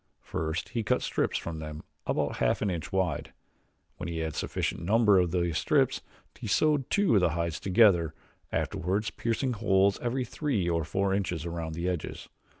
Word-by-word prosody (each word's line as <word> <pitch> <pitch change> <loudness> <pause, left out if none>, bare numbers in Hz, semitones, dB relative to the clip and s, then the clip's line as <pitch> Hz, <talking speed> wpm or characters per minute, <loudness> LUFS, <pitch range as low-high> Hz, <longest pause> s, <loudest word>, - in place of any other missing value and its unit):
First 80 +2 -3
he 115 - -1
cut 125 +4 +1
strips - - 0
from 80 -2 -5
them 75 0 -7 0.2
about - - 0
half - - +1
an 100 - +1
inch 85 -3 -4
wide. 95 -5 -1 0.6
When 90 - -5
he 85 - -3
had 80 -1 -2
sufficient - - -2
number 105 +1 +4
of 90 -1 +2
these 85 -2 0
strips - - +2 0.4
he 120 - -5
sewed 145 +5 +2
two 200 - +3
of 100 - +5
the 90 - +4
hides 85 -2 -1
together, 95 -5 +4 0.4
afterwards 100 +3 -1
piercing 120 +3 -1
holes 100 -3 +3
every 125 +1 -1
three 125 - -1
or 85 -1 +1
four 95 +5 0
inches 90 -5 -1
around 85 -2 -4
the 85 +2 -2
edges. 90 -3 -4
95 Hz, 175 wpm, -29 LUFS, 85-110 Hz, 0.6 s, of